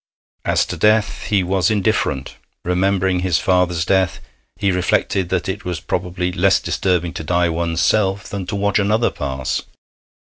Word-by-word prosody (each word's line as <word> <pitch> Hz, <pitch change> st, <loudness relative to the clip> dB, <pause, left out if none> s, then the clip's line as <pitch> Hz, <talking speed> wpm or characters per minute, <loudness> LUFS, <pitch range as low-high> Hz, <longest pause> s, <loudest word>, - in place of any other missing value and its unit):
As -, -, +2 dB
to -, -, -5 dB
death, 105 Hz, 0 st, +2 dB
he 100 Hz, -3 st, +2 dB
was 95 Hz, +2 st, +1 dB
indifferent. 100 Hz, -10 st, 0 dB, 0.3 s
Remembering 95 Hz, +1 st, +1 dB
his 90 Hz, -2 st, +1 dB
father's 90 Hz, -3 st, +1 dB
death, 95 Hz, -1 st, +1 dB, 0.4 s
he 100 Hz, -2 st, 0 dB
reflected 90 Hz, 0 st, 0 dB
that 95 Hz, -2 st, -1 dB
it 95 Hz, +2 st, -4 dB
was 90 Hz, -3 st, -3 dB
probably 90 Hz, +3 st, -2 dB
less 95 Hz, +1 st, +3 dB
disturbing 90 Hz, -3 st, -1 dB
to 85 Hz, -, -5 dB
die 85 Hz, +2 st, +1 dB
one's 85 Hz, 0 st, -1 dB
self 100 Hz, -2 st, +1 dB
than 100 Hz, -3 st, -5 dB
to 100 Hz, -, -3 dB
watch 100 Hz, +1 st, +1 dB
another 105 Hz, +3 st, +2 dB
pass. 65 Hz, -2 st, -3 dB
95 Hz, 155 wpm, -19 LUFS, 90-100 Hz, 0.4 s, less